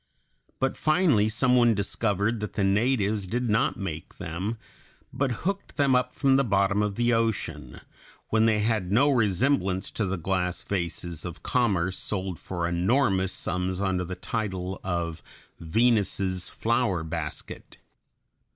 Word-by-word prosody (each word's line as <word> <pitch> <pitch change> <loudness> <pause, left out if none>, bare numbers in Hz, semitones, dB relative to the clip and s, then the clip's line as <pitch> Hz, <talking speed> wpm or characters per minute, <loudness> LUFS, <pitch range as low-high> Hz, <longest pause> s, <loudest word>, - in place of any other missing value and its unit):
But 135 - 0
finally 155 - +3
some 125 +3 +2
one 120 -2 +5
discovered 105 +2 0
that 105 -1 -5
the 100 - 0
natives 105 -1 +1
did 120 +3 -1
not 135 +8 +2
make 80 -5 -6
them, 95 +8 -4 0.6
but 135 -2 0
hooked 200 +1 -3
them 140 -2 +4
up 125 0 +1
from 135 -1 +3
the 140 - +3
bottom 100 -2 +2
of 105 -1 -1
the 120 +2 +2
ocean, 90 - -2 0.5
when 110 0 +3
they 105 -2 +2
had 105 -4 0
no 140 +8 +4
resemblance 105 -4 +1
to 105 - -2
the 95 +1 -2
glass 90 +1 -1
vases 85 -3 -3
of 85 -1 -8
commerce 95 -7 +1
sold 95 -4 -3
for 85 -2 -3
enormous 95 +2 +2
sums 90 +1 -2
under 95 -2 0
the 90 +1 -5
title 95 -5 -4
of 85 -3 -2 0.4
Venus's 95 -1 +1
flower 115 -7 0
basket. 80 -1 -6
100 Hz, 140 wpm, -26 LUFS, 90-120 Hz, 0.6 s, one